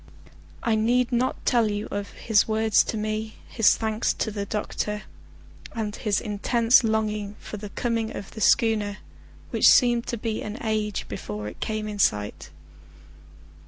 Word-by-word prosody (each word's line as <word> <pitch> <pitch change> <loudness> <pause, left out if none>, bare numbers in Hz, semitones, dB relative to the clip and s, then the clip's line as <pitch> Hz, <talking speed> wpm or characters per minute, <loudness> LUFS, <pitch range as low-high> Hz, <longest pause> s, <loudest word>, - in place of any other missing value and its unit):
I 230 - +2
need 235 +3 +2
not 250 +1 -1
tell 235 -3 +3
you 205 +1 -3
of 200 -1 -3
his 220 -3 +2
words 220 0 +3
to 220 - -3
me, 215 +1 -3
his 225 -3 +3
thanks 220 0 0
to 220 - -2
the 200 -1 -4
doctor, 210 0 -3 0.7
and 215 -2 -3
his 210 -2 0
intense 230 +3 +3
longing 215 -2 -1
for 210 - -7
the 205 0 -7
coming 230 +1 -2
of 195 - -8
the 220 - -8
schooner, 215 -4 +3 0.5
which - - +4
seemed 240 -2 +4
to 235 - -2
be 220 0 -3
an 210 +2 -5
age 215 -2 -1
before 105 0 -5
it 105 - -9
came 215 -1 -3
in 210 -1 -6
sight. 105 - 0
215 Hz, 160 wpm, -25 LUFS, 210-225 Hz, 0.7 s, which